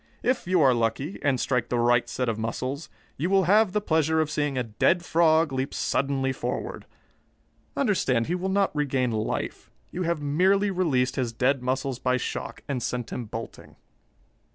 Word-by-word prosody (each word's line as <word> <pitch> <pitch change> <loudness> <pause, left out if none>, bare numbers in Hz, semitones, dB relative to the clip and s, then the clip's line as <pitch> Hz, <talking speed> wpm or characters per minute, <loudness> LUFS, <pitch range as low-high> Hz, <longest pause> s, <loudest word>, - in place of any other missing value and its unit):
If 250 -6 0
you 180 -2 +3
are 130 -2 +6
lucky, 120 - -1
and 135 -3 +1
strike 125 -2 0
the 120 - 0
right 120 0 +3
set 125 +1 -2
of 110 -1 -1
muscles, 130 +6 -4 0.3
you 165 +6 -1
will 195 0 +4
have 205 +3 +4
the 210 - +1
pleasure 160 -3 +1
of 155 -1 0
seeing 145 -3 -1
a 125 - +1
dead 170 - +1
frog 160 -2 +3
leap 130 +2 -2
suddenly 135 0 0
forward. - - -4 0.9
Understand, 155 - +1
he 170 - -2
will 180 +1 -2
not 195 -3 +1
regain 135 -4 0
life. 110 -1 -3 0.2
You 180 - -4
have 170 -2 0
merely 190 +8 +2
released 145 -10 +1
his 125 -3 0
dead 130 +3 +1
muscles 130 0 -2
by 125 0 +1
shock, 125 - -5
and 135 -3 -2
sent 120 -1 -3
him 120 - -4
bolting." 115 +2 -8
140 Hz, 175 wpm, -26 LUFS, 125-170 Hz, 0.9 s, are